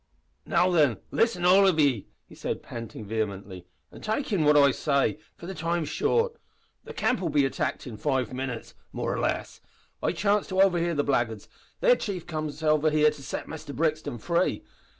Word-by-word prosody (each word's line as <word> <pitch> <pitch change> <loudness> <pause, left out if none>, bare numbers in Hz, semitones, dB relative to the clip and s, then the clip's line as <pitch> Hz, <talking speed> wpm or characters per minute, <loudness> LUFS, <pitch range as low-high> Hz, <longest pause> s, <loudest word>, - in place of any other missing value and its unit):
"Now, 180 +1 +3
then, 145 - +3
listen, 225 -6 +1
all 195 +2 +6
of 175 -4 +2
ye," 135 -9 +2 0.2
he - - -17
said, - - -4
panting 115 -2 -8
vehemently, 100 -4 -4 0.2
"an' - - -12
take 220 +2 -2
in 175 -6 +2
what 150 0 +6
I 140 -1 +6
say, 140 +1 0 0.2
for - - -11
the 190 - -5
time's 165 -1 -2
short. 465 0 +1 0.5
The - - -8
camp'll 190 -9 0
be 145 -2 +3
attacked 135 - -2
in 120 -5 -7
five 130 -3 -1
minits 130 -2 -5 0.2
more - - -2
or - - -2
less. - - -2 0.4
I - - +1
chanced 205 0 +1
to 190 0 -1
overhear 175 -3 +3
the 145 - +1
blackguards. 120 -7 -1 0.3
Their - - +6
chief 195 - -4
comes 155 -2 -4
here 155 -1 +3 0.3
to 150 - -11
set - - -5
Muster 155 -2 -7
Brixton 155 -4 -1
free. 170 +10 0
155 Hz, 180 wpm, -27 LUFS, 130-180 Hz, 0.5 s, all